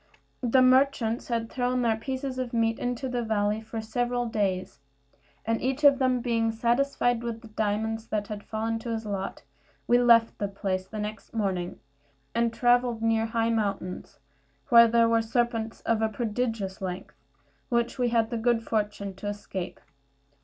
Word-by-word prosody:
The 255 +1 +4
merchants 255 -3 +3
had 230 -2 -1
thrown 250 +1 -1
their 225 -2 +2
pieces 260 +3 -4
of 250 -2 -3
meat 225 -1 +1
into 245 +1 -2
the 245 -1 -2
valley 215 -1 0
for 225 0 -5
several 245 +2 -1
days; 200 -8 -2 0.7
and 225 0 0
each 265 +3 -1
of 280 -1 +7
them 255 -2 +2
being 230 -2 +1
satisfied 240 +1 +1
with 230 -1 -4
the 225 - -12
diamonds 220 +1 -2
that 210 -2 -2
had 210 -1 -6
fallen 225 +1 -2
to 235 - -7
his 225 -1 -3
lot, 200 -2 -4 0.4
we 240 0 +4
left 235 -2 +5
the 205 - 0
place 190 -1 -3
the 215 - -8
next 210 +1 -6
morning, 190 -5 -2 0.5
and 235 0 +1
travelled 240 -1 +2
near 225 0 +2
high 230 0 0
mountains, 200 -5 -3 0.5
where 235 -1 +8
there 230 0 +4
were 230 0 +3
serpents 225 0 -1
of 225 -1 0
a 220 - +2
prodigious 220 -3 -2
length, 185 -1 -5 0.6
which 235 +1 0
we 245 -1 +2
had 230 -1 +1
the 235 - -1
good 230 0 +1
fortune 210 -3 -2
to 205 - -6
escape. 205 -3 -5
225 Hz, 165 wpm, -27 LUFS, 215-240 Hz, 0.7 s, where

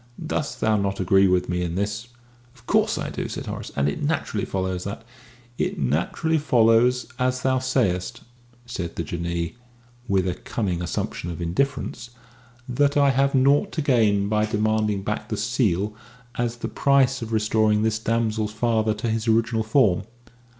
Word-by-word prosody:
Dost 155 -1 -3
thou 110 -1 +3
not 100 -1 -1
agree 95 +1 +4
with 90 -1 +2
me 90 0 -1
in 85 -1 -2
this?" 105 +4 -2 0.5
"Of 125 - -21
course - - +2
I - - -3
do," - - -4
said - - -5
Horace. - - -6
"And 70 0 +1
it 75 - -2
naturally 145 -8 -1
follows 95 -1 -2
that 100 +3 -6 0.3
" - - -24 0.2
"It - - -1
naturally 85 - 0
follows, 120 -2 +3
as 125 0 0
thou 130 0 +2
sayest," 115 -9 0 0.4
said 90 -8 -5
the 85 - -2
Jinnee, 85 +4 -3 0.5
with 95 -3 +1
a 90 - 0
cunning 90 -5 -3
assumption 85 0 -3
of 85 - -6
indifference, 120 +7 -2 0.6
"that 140 +3 +1
I 140 -1 +5
have 135 +1 +2
naught 140 +9 +3
to 155 - -1
gain 110 -7 +3
by 105 +1 +1
demanding 105 -2 0
back 105 +2 -3
the 110 - -2
seal 105 -3 0 0.4
as 120 -1 -2
the 120 - -5
price 135 -2 +2
of 115 -1 -5
restoring 110 -1 +2
this 110 -1 +1
damsel's 110 -2 -1
father 110 -1 +1
to 110 +2 -3
his 110 0 -1
original 115 0 +2
form. 110 -4 +2
110 Hz, 170 wpm, -24 LUFS, 95-125 Hz, 0.6 s, I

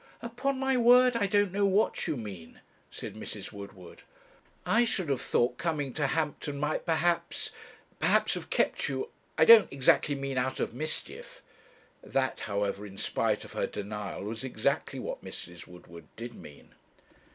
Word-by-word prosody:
'Upon 255 +4 -2
my 265 0 +1
word 245 +1 +6
I 205 -4 +2
don't 205 -1 +2
know 200 +1 +2
what 200 +3 +1
you 150 - -1
mean,' 95 -8 -8 0.3
said - - -7
Mrs. - - -6
Woodward. 100 -3 -11 0.6
'I 235 +2 +4
should 190 -8 -1
have 135 -3 0
thought 125 +1 +1
coming 150 -6 -1
to 145 -3 0
Hampton 150 -2 -2
might 150 +4 -1
perhaps 170 +1 0 0.5
perhaps - - +3
have - - -6
kept - - +1
you 440 - -3 0.3
I - - +6
don't 230 -2 +9
exactly 135 +2 +3
mean 135 -1 -2
out 130 +1 -1
of - - -1
mischief.' 155 +5 -6 0.6
That, 130 -1 -1
however, 100 -1 -2
in 100 -1 -10
spite - - 0
of - - -12
her - - -1
denial, 105 -1 -5
was 110 +3 -5
exactly 130 - -1
what - - -5
Mrs. 85 0 -8
Woodward 85 -3 -13
did 120 +1 -7
mean. 75 -9 -14
140 Hz, 160 wpm, -29 LUFS, -, 0.6 s, don't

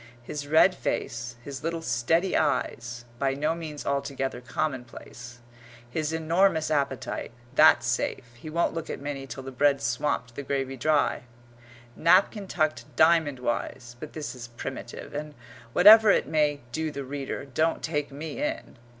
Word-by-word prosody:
His 145 +3 -6
red 160 +5 +5
face, 120 -7 -3
his 140 0 -7
little 165 0 -2
steady 160 +10 +1
eyes 120 -5 -1
by 135 -1 +1
no 150 +3 0
means 155 -3 -7
altogether 140 -2 -2
commonplace 120 -3 -5 0.5
his 155 +5 -2
enormous 160 0 +2
appetite 140 -5 -1 0.2
(that's 155 0 +6
safe; 120 +1 -1
he 120 +6 -10
won't 170 +2 +1
look 165 -1 -5
at - - -4
Minnie 140 -1 -5
till 135 - -7
the 135 - -7
bread's 140 +1 +2
swamped 120 +1 -1
the 140 - -5
gravy 135 -1 -2
dry), 145 -1 +1 0.7
napkin 190 +4 +3
tucked 155 -9 0
diamond 160 -4 +4
wise 120 0 -3
but 155 - -8
this 155 -2 -5
is 125 -2 -8
primitive, 120 0 -7
and, 150 0 -5 0.4
whatever 215 - +9
it - - +4
may 150 -2 +1
do 160 +5 -2
the 140 -2 -5
reader, 135 +1 -5
don't 155 +5 0
take 150 -3 -2
me 155 - -6
in. 300 - -3
145 Hz, 150 wpm, -27 LUFS, 130-160 Hz, 0.7 s, whatever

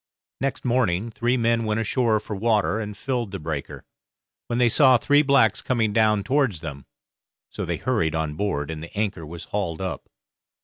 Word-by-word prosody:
Next 135 -1 -3
morning 115 -4 +1
three 120 +3 0
men 115 -1 +1
went 110 0 0
ashore 115 0 +1
for 105 - -6
water 110 0 +1
and 105 -2 -5
filled 125 -5 -2
the 95 - -5
breaker, 75 -4 -5 0.6
when 120 - -2
they 125 -1 +4
saw 130 +2 +6
three 145 +5 +4
blacks 135 -7 +3
coming 115 -5 0
down 110 -2 +3
towards 130 - +1
them; 70 -5 -8 0.6
so - - -4
they - - -2
hurried 85 -12 0
on 80 -1 -1
board, 80 -4 -2
and 80 -1 -6
the 85 +4 -10
anchor 100 -7 -2
was 85 +2 -8
hauled 90 -6 -3
up. 95 -2 -5
110 Hz, 180 wpm, -24 LUFS, 85-120 Hz, 0.6 s, saw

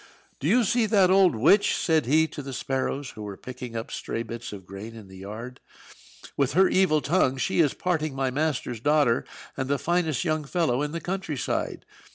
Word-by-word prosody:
"Do 140 - -2
you 240 +7 +4
see 230 +2 +2
that 195 -4 +4
old 190 -7 +5
witch?" 195 - +4
said 160 -6 +1
he 160 +4 +4
to - - -7
the 135 -1 -7
sparrows, 135 +1 -2
who 110 - -10
were 100 -2 -6
picking 125 -2 -8
up 115 0 -5
stray 115 - -4
bits 115 +1 -7
of 100 -3 -9
grain 100 +5 -9
in 105 -4 -12
the 95 - -12
yard. 110 +6 -8 0.8
"With 140 -3 +1
her 190 +3 +5
evil 185 -5 +3
tongue 145 -5 +2
she 180 +7 0
is 150 -5 +3
parting 155 -5 -1
my 135 -1 0
master's 140 -4 -1
daughter 145 -2 +2 0.3
and 130 -1 -3
the 140 - +2
finest 160 -4 0
young 155 -2 0
fellow 145 -5 0
in 150 0 -2
the 165 +1 -4
country 180 -3 -3
side. - - -3
140 Hz, 200 wpm, -26 LUFS, 120-170 Hz, 0.8 s, old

